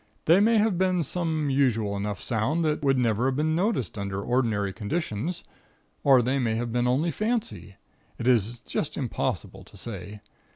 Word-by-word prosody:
They 170 +4 +6
may 225 +2 +4
have 210 -4 +2
been 185 -2 +2
some 160 -2 -1
usual 115 -7 +1
enough 100 -1 -3
sound 135 +9 0
that 155 0 0
would 135 -1 +3
never 120 0 +1
have 135 - 0
been 155 +2 +1
noticed 170 - -1
under 100 -1 -3
ordinary 110 -3 0
conditions, 155 - -3 0.6
or 135 -3 +6
they 130 +3 +1
may 115 -3 0
have 120 +1 -2
been 120 +1 +1
only 145 +7 +1
fancy. 220 - -3 0.4
It 120 - -3
is 120 -1 +2
just - - -3
impossible - - -3
to - - -16
say. 105 -2 -7
130 Hz, 170 wpm, -26 LUFS, 110-165 Hz, 0.6 s, They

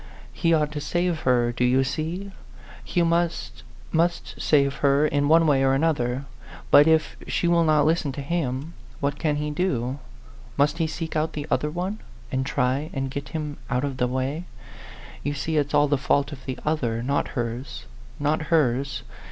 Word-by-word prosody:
He 165 -2 +1
ought 150 -2 +2
to 150 -1 -4
save 175 +1 0
her, 120 -1 +3
do 120 +1 -2
you 130 +2 +4
see? 170 +8 -3 0.5
He 175 - +1
must, 170 - 0 0.3
must 170 +1 0
save 140 -2 +3
her 140 +1 +3
in 145 -1 +1
one 165 +2 +5
way 140 -3 +3
or 135 0 +3
another. 135 -4 0 0.5
But 145 +2 +8
if 160 -2 +3
she 175 - 0
will 170 0 +4
not 155 -2 +4
listen 160 -2 +1
to 140 - -5
him, 145 -1 -2 0.3
what 140 +1 -1
can 150 -3 +1
he 150 0 -2
do? 140 -6 -1 0.6
Must 145 +4 +2
he 165 - +2
seek 160 +1 -5
out 155 +1 0
the 145 -1 -4
other 150 - +1
one, 180 +6 -3 0.3
and 130 +1 -1
try 140 +3 0
and 135 -1 -2
get 140 0 -5
him 150 -3 -4
out 125 +2 0
of 140 -2 -3
the 125 - +1
way? 130 +6 -2 0.8
You 145 +1 -2
see 155 +3 -1
it's 145 -1 +1
all 145 - +5
the 145 -1 +1
fault 140 +1 +1
of 135 -3 -10
the 130 - -3
other 120 -7 0
not 140 +3 0
hers, 120 +1 -4 0.3
not 150 +2 +1
hers. 135 -4 +1
145 Hz, 185 wpm, -25 LUFS, 135-160 Hz, 0.8 s, But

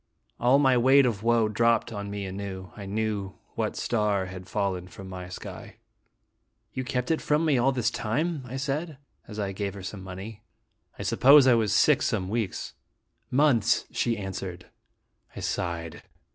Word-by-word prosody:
All 125 +3 +5
my 135 -3 +4
weight 135 +3 +6
of 110 -5 -1
woe 115 -1 +3
dropped 115 +2 +2
on 100 -1 -5
me 100 -1 -4
anew. 95 -1 -6
I 100 -2 -8
knew 105 -2 -2 0.2
what - - -2
star 105 -4 0
had 90 0 -9
fallen 95 -3 -1
from 95 +1 -11
my 90 -1 -7
sky. 90 - -9 0.5
" - - -48
You 130 - -3
kept 125 +1 -2
it 160 - +1
for 150 - +2
me 155 -5 +2
all 130 +3 +3
this 125 -4 0
time?" 150 +8 -1
I 130 +2 -5
said, 145 +3 -3 0.3
as 105 - -9
I 100 -2 -2
gave 100 0 -4
her 95 - -8
some 95 +1 -6
money. 95 +3 -8 0.3
" - - -38
I - - -5
suppose 140 +1 +6
I 130 - +6
was 110 -3 +2
sick - - +4
some 95 0 -1
weeks." 110 -3 -3 0.6
"Months," 125 -5 +3
she 115 -1 0
answered. 95 -2 -6 0.7
I - - -6
sighed. 85 -1 -3
110 Hz, 175 wpm, -27 LUFS, 95-125 Hz, 0.7 s, weight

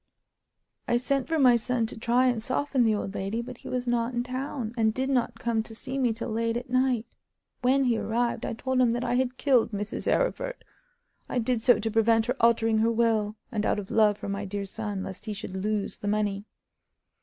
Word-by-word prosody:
I 240 - +3
sent 270 +2 0
for 325 - 0
my 255 -5 +6
son 235 0 0
to - - -5
try 240 +3 +2
and 245 -3 +1
soften 260 +2 0
the 220 -1 +3
old 200 -1 -4
lady, 200 +4 -2
but 245 +1 -7
he - - -9
was 250 0 -2
not 240 0 0
in 240 - 0
town, 255 -2 -4
and 220 -2 +1
did 265 +1 -1
not 250 -3 0
come 230 -2 0
to 225 0 -9
see 265 +4 -4
me 250 -3 +2
till 225 +1 -4
late 230 +1 0
at 245 0 -7
night. 255 -3 +2 0.6
When 265 +2 +3
he 240 -3 +2
arrived 235 +1 -1
I - - -2
told 260 +3 0
him 235 -2 +3
that 240 +1 -2
I - - 0
had 255 0 0
killed 255 -4 +3
Mrs. 205 +1 -2
Arryford. - - -1 0.7
I - - -2
did 240 -1 0
so 240 -1 +5
to 220 +1 -2
prevent 225 0 +3
her 250 +2 -1
altering 225 -1 +3
her 225 +1 +3
will, 220 -2 +1 0.2
and 215 -3 -1
out - - +1
of 200 -2 -6
love 210 -2 +4
for - - -7
my 200 +1 -3
dear 200 0 -4
son, 205 -1 -4
lest 190 +2 -8
he 215 - -3
should 200 -2 -7
lose 205 +1 -2
the 205 - -6
money. 205 -1 0
230 Hz, 225 wpm, -27 LUFS, 215-250 Hz, 0.7 s, my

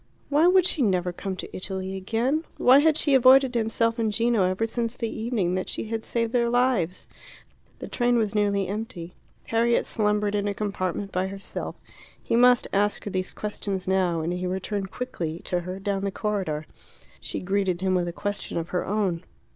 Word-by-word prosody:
Why 300 +4 +4
would 370 0 +5
she 340 -4 0
never 180 -5 +1
come 190 +1 -4
to - - -8
Italy 190 0 -4
again? 230 - 0
Why 260 +2 +6
had 310 +1 +4
she 290 - +2
avoided 265 0 +6
himself 230 0 0
and 220 -2 +1
Gino 230 0 +2
ever 185 +4 0
since 230 +1 -3
the 230 - -2
evening 220 -6 -1
that 185 0 -2
she 215 - -4
had 225 -1 -3
saved 230 0 -2
their 235 -1 +2
lives? 240 -8 +1 0.7
The - - -7
train 240 -1 +1
was 215 -2 0
nearly 200 -2 +1
empty. 190 -4 -5 0.3
Harriet 235 +1 +2
slumbered 210 -1 0
in 205 0 0
a 200 - -2
compartment 195 -1 -3
by 185 +1 0
herself. 195 0 -6 0.4
He - - -1
must 245 +1 +5
ask 205 +1 +1
her 205 - -5
these 185 0 -2
questions 200 -3 -4
now, 185 -3 +1
and 165 +3 -2
he 180 0 -3
returned 195 +2 -3
quickly 175 -9 -4
to 180 - 0
her 180 +2 -6
down 195 0 -2
the 200 - 0
corridor. 190 -8 -2 0.5
She - - -5
greeted 190 -1 0
him 190 -1 +1
with 180 -1 +1
a - - -2
question 205 +2 -4
of 165 0 -3
her 180 - -1
own. 190 -4 -1
205 Hz, 190 wpm, -25 LUFS, 185-230 Hz, 0.7 s, Why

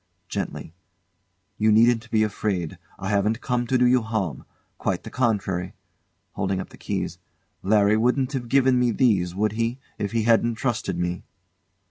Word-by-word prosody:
[Gently] 80 - -4 0.9
You 110 0 +4
needn't 115 +1 +4
be 110 -1 +3
afraid. 100 -5 -2 0.2
I 95 - -4
haven't 105 +2 +1
come 120 -1 -1
to 130 - +2
do 125 - +4
you 125 0 +4
harm 105 - -3 0.3
quite - - -1
the - - -9
contrary. 95 -7 -1 0.6
[Holding 95 - -1
up 95 - -6
the - - -15
keys] - - -4 0.4
Larry 105 +1 +3
wouldn't 125 +4 +1
have 125 -3 -3
given 130 -1 +4
me 125 -1 +3
these, 100 -7 +2
would 105 +1 +1
he, 115 +3 -1 0.2
if 100 - -2
he 115 -1 0
hadn't 115 +1 +3
trusted 110 -6 -2
me? 90 0 -2
110 Hz, 160 wpm, -24 LUFS, 100-120 Hz, 0.9 s, You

